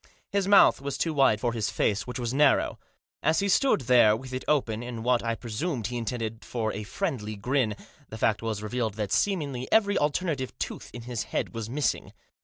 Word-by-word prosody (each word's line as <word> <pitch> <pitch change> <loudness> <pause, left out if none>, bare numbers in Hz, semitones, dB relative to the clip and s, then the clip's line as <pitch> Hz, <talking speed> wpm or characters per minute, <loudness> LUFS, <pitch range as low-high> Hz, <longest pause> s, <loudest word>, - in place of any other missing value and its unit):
His 200 -1 0
mouth 200 -8 +6
was 140 -1 -3
too 165 - 0
wide 135 -7 +4
for 120 +1 -1
his 110 -3 -1
face, 105 +2 0
which 125 - -5
was 120 -1 -2
narrow. 145 0 +3 0.4
As 155 +2 +2
he 200 - +1
stood 260 - +3
there 115 -3 +5
with 130 +2 -10
it 130 - -3
open, 120 -7 +1
in 120 -2 -6
what 125 0 +2
I 115 0 -1
presume 120 +4 -3
he 120 +4 -3
intended 115 -1 -4
for 110 -3 -2
a 105 - -4
friendly 110 - -3
grin, 120 +1 0 0.3
the 110 - -7
fact 110 -1 +1
was 110 -2 -3
revealed 110 -1 -2
that 105 -2 -3
seemingly 145 - 0
every 205 -2 +3
alternate 150 0 0 0.2
tooth - - -5
in 120 - -8
his 120 -1 -4
head - - -3
was 115 -1 -5
missing. 140 0 -1
125 Hz, 205 wpm, -27 LUFS, 110-145 Hz, 0.4 s, mouth